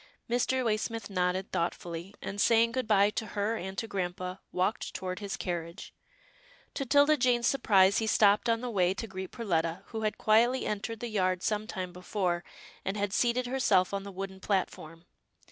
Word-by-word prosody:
Mr. 250 +2 +1
Waysmith 225 0 -2
nodded, 185 0 0
thoughtfully, 170 +2 -3
and, 200 +1 -3
saying 230 0 +4
good 255 -1 -2
bye 205 -1 +4
to 220 - -3
her 210 +3 +1
and 190 -2 -6
to 225 - -2
grampa, 185 -1 -4
walked 185 +5 -1
toward 185 -1 -4
his 200 -2 -4
carriage. 170 +1 -5 0.8
To 275 - -3
'Tilda 290 +3 +5
Jane's 245 -2 +2
surprise, 200 -7 +4
he 220 - -1
stopped 210 +2 +4
on 230 0 +2
the 250 -1 -3
way 185 -3 +2
to 225 - -4
greet 190 -3 -6
Perletta, 175 -5 -1
who 220 -1 -4
had 215 -1 -1
quietly 235 +4 +3
entered 215 +2 -3
the 240 - -3
yard 185 -4 0
some 215 0 -1
time 185 -4 -5
before, 180 -1 -2 0.4
and 195 +2 -2
had 205 -1 -1
seated 245 +2 +2
herself 245 -8 +2
on 200 - -1
the 200 0 -8
wooden 190 0 -6
platform. 175 -4 -3
200 Hz, 180 wpm, -30 LUFS, 185-230 Hz, 0.8 s, Tilda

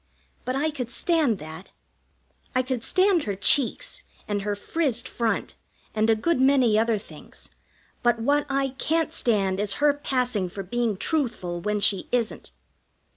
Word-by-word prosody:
But 255 - -2
I 305 +3 0
could 250 -5 -5
stand 305 - +1
that. 160 +2 -10 0.9
I 255 - +3
could 255 -3 -3
stand 370 -3 +3
her 200 -2 -2
cheeks, 270 - +3 0.3
and 205 -1 -1
her 205 +1 -2
frizzed 245 +1 -2
front, 230 -2 -2 0.4
and 220 +1 +1
a 225 - +5
good 280 +6 0
many 260 -5 +4
other 225 0 +2
things; 200 - -12 0.5
but 240 -1 +2
what 290 +5 +1
I 275 0 0
can't 325 0 0
stand 195 -5 +1
is 205 -1 +1
her 290 0 +3
passing 250 -9 -1
for 195 +2 -6
being 225 +1 -1
truthful 220 - -1
when 210 +3 -1
she 195 -2 +3
isn't. 240 -2 -2
240 Hz, 155 wpm, -25 LUFS, 210-280 Hz, 0.9 s, a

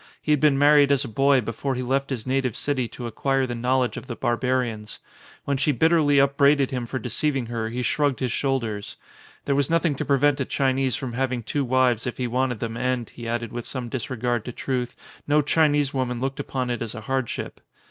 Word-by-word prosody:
He 150 - -2
had 150 - +4
been 150 -2 +4
married 145 0 +5
as 140 -2 +2
a - - -5
boy" 135 +3 +3
before 115 +5 -3
he 125 - -3
left 135 +2 0
his 125 -5 -4
native 130 -3 0
city 130 -4 -1
to 120 - -8
acquire 135 +4 0
the 120 - -4
knowl 125 +2 +1
edge 125 - -3
of - - -8
the 120 - -5
barbarians. 120 -2 -1 0.5
When 140 -1 0
she 145 +2 +2
bitterly 145 +1 +3
up 140 0 +2
braided 140 -1 +4
him 125 -2 -3
for 130 - -3
deceiving 130 +2 -1
her 115 -1 -3
he 125 +2 -3
shrugged 145 0 +1
his 125 -3 -1
shoulders. 115 -7 -2 0.5
There 140 - +1
was 140 -1 +1
nothing 165 -1 +2
to 135 - -3
prevent 145 0 +2
a - - 0
Chi 135 0 +1
nese 130 -3 0
from 130 -3 -5
having 125 -1 -1
two 140 +5 -1
wives 130 -1 +2
if 125 - -4
he 125 - -1
wanted 125 -1 -1
them 115 -1 -3
and, 125 -2 -1
he 120 -1 -8
added 115 -1 -2
with 120 -1 -5
some 125 -3 -5
disregard 120 -2 -2
to 125 - -4
truth, 125 0 -3 0.3
no 150 +1 +3
Chinese 145 -2 +2
woman 125 -2 -1
looked 135 +2 -3
upOn 130 -3 -3
it 120 - -3
as 115 0 -5
a 110 - -6
hardship. 130 +1 -3
130 Hz, 225 wpm, -24 LUFS, 120-140 Hz, 0.5 s, married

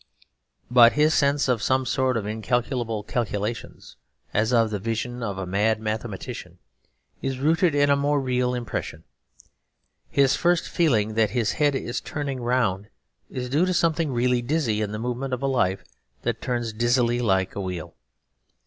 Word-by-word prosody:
But 120 -1 +7
his 150 +1 +3
sense 140 -1 +2
of 125 -4 +1
some 130 0 +1
sort 130 -1 +1
of 105 - -3
incalculable 115 +1 -1
calculations, 110 - -4 0.4
as 110 +2 +1
of 115 -3 +3
the 105 - -2
vision 115 +4 -3
of 100 -5 -3
a 95 - -3
mad 105 +4 +1
mathematician, 110 -2 -5 0.6
is 135 -1 -2
rooted 160 +3 +2
in 145 0 +4
a - - +5
more 145 +1 +1
real 125 -1 0
impression. 120 -3 -5 1.1
His 135 -1 +3
first 175 0 +1
feeling 115 - +1
that 110 -1 +2
his 110 0 0
head 145 -2 +1
is 120 -1 -3
turning 140 -3 -4
round 120 -5 0 0.4
is 125 -1 -4
due 150 +8 +2
to 185 - 0
something 165 -3 +1
really 125 0 +1
dizzy 120 -5 0
in 105 -1 -2
the 105 - -4
movement 125 +3 -2
of 125 - -9
a - - +2
life 95 -8 +1 0.4
that - - -2
turns 120 -3 -2
dizzily 120 +1 +2
like 95 -5 +1
a 100 - -4
wheel. 90 -4 -5
120 Hz, 165 wpm, -24 LUFS, 110-135 Hz, 1.1 s, But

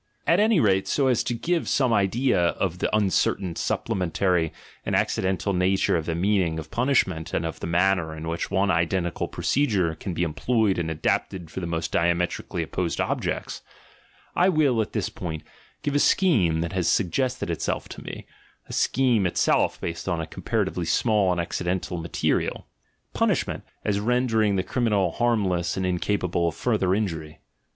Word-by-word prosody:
At - - +4
any 215 -3 +4
rate, 95 -6 +2
so 140 - +1
as 125 - +2
to 120 - -1
give 170 +7 -1
some 130 -5 +2
idea 110 +4 +2 0.2
of 90 -2 -1
the - - 0
uncertain, 95 -3 +1
supplementary, 90 -2 0 0.3
and - - -1
accidental 95 +1 0
nature 95 +1 +2
of 80 -2 -2
the 85 - -1
meaning 90 -2 +1
of 80 -1 -7
punishment 115 - +1
and - - 0
of 80 - -5
the - - -4
manner 85 -2 +1
in 80 +1 -6
which 85 +1 -3
one 100 0 +2
identical 85 +1 0
procedure 100 - +1
can 85 +3 -6
be 85 - 0
employed 95 +5 +1
and 80 -1 -2
adapted 80 +2 -2
for - - -5
the 85 - -4
most 80 -1 -2
diametrically 85 +1 0
opposed - - -3
objects, - - -2 0.7
I 180 +2 +4
will 145 -9 +3
at 105 - -4
this - - -1
point 80 -3 -6 0.4
give 145 - -1
a 145 - +3
scheme 100 - +3
that 85 +1 -3
has 90 -3 0
suggested 125 +2 0
itself 80 - -2
to - - -9
me, - - -8 0.4
a - - -8
scheme 120 -7 +2
it 85 - -5
self - - +2
based 85 +3 -4
on 80 -3 -1
comparatively 85 +2 -2
small 105 0 +2
and 90 - -1
accidental 90 +1 -2
ma 85 - -5
terial. - - 0 0.3
— - - -45
Punishment, - - 0 0.2
as 100 -1 +1
rendering 110 -2 +2
the 95 - 0
criminal 105 -6 +1
harmless 95 -7 0
and 95 - -1
incapable 90 -1 0
of 85 - -2
further 100 -6 +1
injury. 80 -7 -3
95 Hz, 170 wpm, -25 LUFS, 85-110 Hz, 0.7 s, At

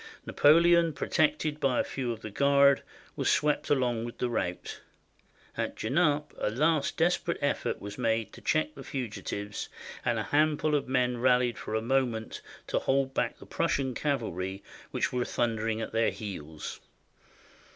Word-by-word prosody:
Napoleon, 170 +2 +5
protected 155 0 0
by 135 -4 +2
a - - +3
few 125 -3 -3
of 115 -1 -6
the 110 - -7
Guard, 140 +2 +4 0.3
was - - 0
swept 150 0 +1
along 125 -5 +1
with 120 0 -7
the 125 -1 -1
rout. 90 -6 -3 0.7
At - - -2
Genappe 150 +4 +1
a - - 0
last 150 +6 +1
des 170 +2 +4
perate 170 - -1
effort 145 - -1
was 100 +2 -8
made 115 -2 0
to - - -12
check 155 0 +1
the 140 - -10
fugitives, 105 -5 -5 0.3
and - - +1
a - - -1
hand 150 0 +2
ful 155 -1 0
of 145 - +1
men 125 -2 +1
rallied 125 -1 +3
for 110 - -4
a 110 - 0
moment 120 -3 -1 0.2
to - - 0
hold 135 0 +1
back - - -1
the - - -13
Prussian 135 -2 0
cavalry 100 - -2 0.3
that - - -1
were 125 -1 +1
thundering 115 -2 -1
at 110 - -4
their 115 0 +2
heels. 80 -7 -7
130 Hz, 165 wpm, -29 LUFS, 110-145 Hz, 0.7 s, Napoleon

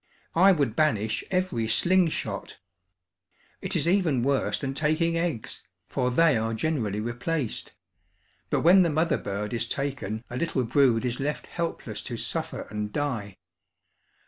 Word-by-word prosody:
I 190 +4 +6
would 140 - +1
banish 110 -8 +1
every 180 -12 0
"sling 180 +10 +3
shot!" 110 -10 -4 1.0
It 190 0 -2
is 165 -1 +1
even 170 -9 +2
worse 135 0 +1
than 135 -2 -3
taking 155 +3 +1
eggs, 165 -9 -2 0.3
for 125 - 0
they 150 +3 +4
are 115 0 -1
generally 110 -7 -1
replaced; 120 +4 -3 0.8
but - - +1
when 180 +4 +7
the 170 - +3
mother 160 0 +1
bird 105 +2 -4
is 115 0 -1
taken 135 -6 -3
a 120 - -6
little 135 -4 0
brood 125 -1 +3
is 125 0 -2
left 145 +2 -2
helpless 170 -1 -4
to - - -4
suffer - - -3
and 105 0 -3
die. 115 -9 -3
140 Hz, 145 wpm, -27 LUFS, 115-165 Hz, 1.0 s, when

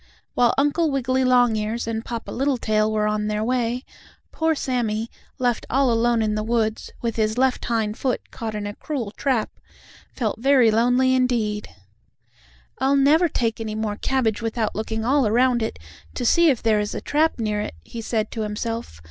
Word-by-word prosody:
While 240 -1 +3
Uncle 295 +4 +2
Wiggily 260 -1 0
Longears 235 -3 +2
and 225 0 -3
Papa 235 -1 -6
Littletail 225 -5 +1
were 215 -1 +1
on 210 0 0
their 210 0 -1
way, 245 +1 -1 0.5
poor 320 0 +1
Sammie, 235 -5 -2 0.3
left 245 -2 0
all 265 -1 +3
alone 230 0 +2
in 215 -1 0
the 215 - -1
woods, 220 -1 -1
with 230 -1 -2
his 215 +1 0
left 260 0 +1
hind 220 -2 -1
foot 255 -3 -2
caught 220 -2 -5
in 210 -1 -4
a 205 - -4
cruel 245 -5 -4
trap, 245 -1 -1 0.6
felt 220 -4 -2
very 255 -3 +4
lonely 245 +4 +3
indeed. 235 -5 0 1.1
"I'll 270 +1 +2
never 305 +5 +4
take 225 -4 -1
any 215 -1 -4
more 215 -1 -2
cabbage 235 -5 0
without 225 -1 -1
looking 220 +1 -3
all 270 -1 +3
around 240 +2 +3
it, 220 - -3 0.4
to 245 - -3
see 340 +6 +5
if 260 -5 0
there 220 -2 +3
is 210 0 -3
a - - -4
trap 310 +2 +1
near 210 -3 -1
it," 210 - -5
he 230 - -7
said 220 -1 -2
to 225 - -4
himself. 215 - -4
230 Hz, 180 wpm, -23 LUFS, 215-255 Hz, 1.1 s, see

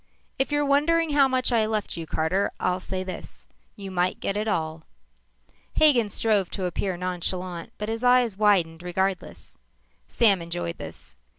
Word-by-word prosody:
"If 270 - +1
you're 290 0 +1
wondering 305 +3 +2
how 285 -2 +5
much 255 -1 +1
I 225 -2 +2
left 215 -2 -2
you, 165 -1 -6
Carter, 170 +7 0
I'll 180 0 0
say 185 0 -4
this: 185 0 -9 0.3
You 195 -3 -8
might 180 0 0
get 195 - -2
it 210 +1 -1
all." 160 -5 -2 0.9
Hagen 255 -9 +5
strove 205 -3 +1
to 190 - -2
appear 180 +1 -2
nonchalant 180 -1 -3
but 210 - -4
his 225 +2 -3
eyes 245 -4 +4
widened 185 -6 +2
regardless. 180 - -3 0.5
Sam 200 -6 +3
enjoyed 85 - -4
this. - - -10
195 Hz, 160 wpm, -25 LUFS, 180-235 Hz, 0.9 s, how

